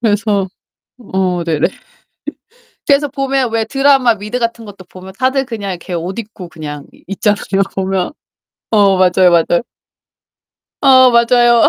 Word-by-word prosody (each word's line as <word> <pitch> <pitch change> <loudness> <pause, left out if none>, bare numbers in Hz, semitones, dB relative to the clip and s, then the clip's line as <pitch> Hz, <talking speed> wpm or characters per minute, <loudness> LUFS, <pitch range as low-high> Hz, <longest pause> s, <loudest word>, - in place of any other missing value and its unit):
그래서 205 -3 0 0.5
어 185 -5 -2
네네. 160 -2 0 1.2
그래서 285 0 +3
보면 270 -3 -1
왜 225 -1 0
드라마 270 -1 +3
미드 210 +4 -5
같은 230 0 -3
것도 200 -2 -12
보면 185 +1 -12
다들 265 +1 +1
그냥 210 -5 -5
이렇게 180 0 -7
옷 175 +5 -4
입고 205 -5 -8
그냥 150 -3 -8
이 - - -22
있잖아요, 200 0 0
보면. 190 -1 -1 0.6
어 200 -3 +4
맞아요, 185 -1 +4
맞아요. 170 +2 +2 1.2
아 260 -2 +6
맞아요. 235 0 +4
205 Hz, 270 characters per minute, -15 LUFS, 185-240 Hz, 1.2 s, 아